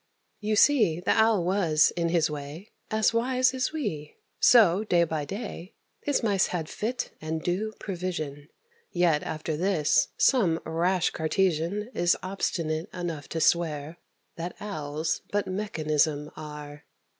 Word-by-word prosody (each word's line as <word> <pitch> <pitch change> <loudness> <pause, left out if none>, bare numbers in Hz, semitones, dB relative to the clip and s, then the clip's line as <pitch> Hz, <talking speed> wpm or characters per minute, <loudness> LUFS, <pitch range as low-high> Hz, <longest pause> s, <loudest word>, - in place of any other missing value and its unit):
You 215 0 0
see 215 - +4
the 180 - 0
Owl 220 -4 +3
was, 170 -5 +3
in 170 -1 0
his 165 -2 +2
way, 150 +6 -8 0.2
As 220 +1 +2
wise 255 +2 +2
as 260 0 -1
we; 185 - -4 0.2
so, 210 -5 +6
day 175 -5 +3
by 160 -3 -2
day, 195 -1 -7 0.3
His 290 -4 0
Mice 200 -4 +2
had 165 -3 -3
fit 240 +4 -3
and 160 0 -3
due 205 +5 -1
provision. 170 -7 -4 0.4
Yet, 175 -4 +2
after 155 0 -4
this, 165 -3 +2
some 185 -12 +3
rash 175 +2 +1
Cartesian 185 +5 0
Is 175 0 +2
obstinate 170 -3 -2
enough 170 -5 -5
to 165 - -3
swear 160 -1 +1 0.4
That 170 +2 -5
Owls 155 -5 -3
but 205 -1 0
mechanism 155 -6 -1
are. 150 -1 -9
175 Hz, 135 wpm, -27 LUFS, 155-205 Hz, 0.4 s, so